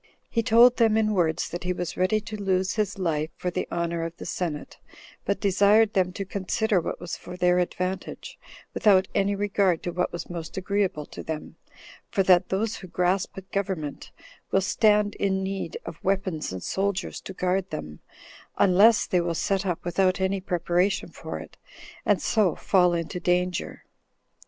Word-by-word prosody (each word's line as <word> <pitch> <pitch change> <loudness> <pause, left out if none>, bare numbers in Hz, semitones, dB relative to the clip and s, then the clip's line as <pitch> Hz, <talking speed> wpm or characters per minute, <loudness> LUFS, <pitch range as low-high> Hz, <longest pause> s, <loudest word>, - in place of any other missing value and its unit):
He 230 - +2
told 235 +2 +6
them 225 -2 +4
in 215 -1 +2
words 165 -4 +1
that 175 - -5
he 180 0 0
was 175 -2 -4
ready 185 +4 +2
to 215 0 -7
lose 190 -2 0
his 210 -1 -1
life 160 -4 -1
for 180 - -3
the - - -2
honor 170 -1 -2
of 165 +1 -5
the - - -8
senate, 160 -5 -4 0.5
but 200 - 0
desired 205 +2 +4
them 185 -2 +2
to 195 - -4
consider 200 +1 0
what - - -4
was 170 -1 -5
for 180 0 -9
their 180 0 +3
advantage, 185 +1 -4 0.3
without 195 -3 +4
any 200 +1 +1
regard 195 -3 +1
to 175 - -2
what 180 +1 -1
was 170 -2 -6
most 170 -1 -7
agreeable 190 -5 -1
to - - -9
them; 155 -1 -6 0.5
for 195 - +1
that 185 -1 +4
those 210 +4 -1
who 185 - -10
grasp 180 +2 0
at 190 0 -10
government 190 -7 -3 0.4
will 195 - +3
stand 210 +1 +3
in 190 -1 0
need 195 - -4
of - - -9
weapons 190 - -1
and 95 -1 -6
soldiers 195 0 -2
to 190 - -8
guard 185 +1 -1
them, 75 - -6 0.6
unless 200 +4 +5
they 180 - +1
will 170 -1 -2
set 195 +3 0
up 175 -2 -3
without 185 +2 +2
any 190 0 0
preparation 180 +1 0
for - - -7
it, - - -12 0.5
and - - +3
so 205 -8 +2
fall 180 -3 +3
into 170 +2 -3
danger. 180 0 -1
185 Hz, 175 wpm, -26 LUFS, 175-200 Hz, 0.6 s, told